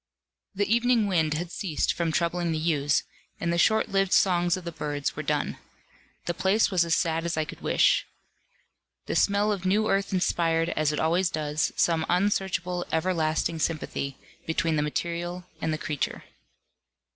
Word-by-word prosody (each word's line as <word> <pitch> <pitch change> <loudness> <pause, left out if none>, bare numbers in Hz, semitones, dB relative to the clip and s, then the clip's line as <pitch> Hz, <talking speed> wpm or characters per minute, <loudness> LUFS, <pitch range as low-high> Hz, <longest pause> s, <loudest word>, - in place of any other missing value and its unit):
The 205 +1 +1
evening 235 -2 +3
wind 160 -6 +1
had 170 +2 -4
ceased 175 -6 -1
from 170 -2 -1
troubling 170 +1 0
the 160 - -1
yews, 150 -2 +1 0.4
and 170 +1 -1
the 170 - 0
short 220 +4 +3
lived 195 -1 +1
songs 175 -1 +3
of 185 - -8
the 170 - -5
birds 145 -3 -3
were - - -3
done. - - -2 0.7
The 175 - -1
place 195 +5 +2
was 180 -3 +3
as 170 -1 +1
sad 165 -2 0
as 170 -1 -2
I 155 - +1
could - - -10
wish. - - +3 1.0
The - - -3
smell 205 +1 +3
of 195 -3 -3
new 205 +3 +2
earth 195 0 0
inspired, 165 -3 +1
as 155 -2 +1
it 150 - -2
always 170 +3 +2
does, 155 -1 -1
some 165 -2 +2
unsearchable 180 -1 0
everlasting 160 -1 0
sympathy 155 -4 -2 0.3
between 160 0 0
the 150 - +1
material 170 +4 -3 0.2
and 160 - 0
the 155 - -1
creature. 150 -2 -3
170 Hz, 170 wpm, -26 LUFS, 160-185 Hz, 1.0 s, evening